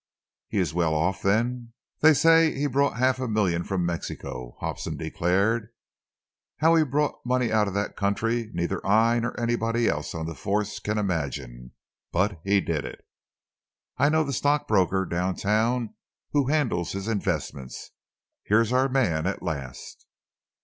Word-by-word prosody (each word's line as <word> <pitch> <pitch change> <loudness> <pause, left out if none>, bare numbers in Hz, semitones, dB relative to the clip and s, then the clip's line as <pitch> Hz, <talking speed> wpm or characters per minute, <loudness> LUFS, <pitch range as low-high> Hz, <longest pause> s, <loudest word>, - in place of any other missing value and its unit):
"He 110 - -4
is 90 -6 +1
well 85 -2 +1
off, 90 +4 0
then?" 115 +4 0 0.3
"They 155 0 +6
say 165 +3 +5
that - - -6
he 145 - 0
brought 140 -2 +1
half 130 +1 +2
a 130 - -2
million 95 -6 +1
from 95 -2 -1
Mexico," 65 -7 -5
Hobson - - -4
declared. 100 +6 0 0.9
"How 160 +2 +4
he 165 -1 +5
brought 150 +1 -1
money 125 -2 0
out 110 -1 +3
of 100 - -4
that 100 +1 -2
country, 115 +3 -1
neither 85 -2 -2
I 115 +4 +3
nor 120 +1 -3
anybody 115 0 0
else 75 +2 -2
on 80 -1 -3
the 80 - -4
Force 105 +4 -2
can 105 +1 -2
imagine. 70 - -3 0.4
But 90 0 0
he 100 0 +3
did 80 -5 -2
it. - - -9 0.9
I 145 - +4
know 160 +1 +3
the 140 -2 -3
stockbroker 110 -10 +2
down 90 +1 -1
town 110 +3 0 0.4
who 145 -3 +2
handles 130 - 0
his 100 +1 -4
investments. 80 - -3 0.5
Here's 115 +3 +2
our 130 +1 +3
man 95 -12 +1
at 95 - -3
last!" 70 -5 -6
105 Hz, 155 wpm, -26 LUFS, 85-125 Hz, 0.9 s, They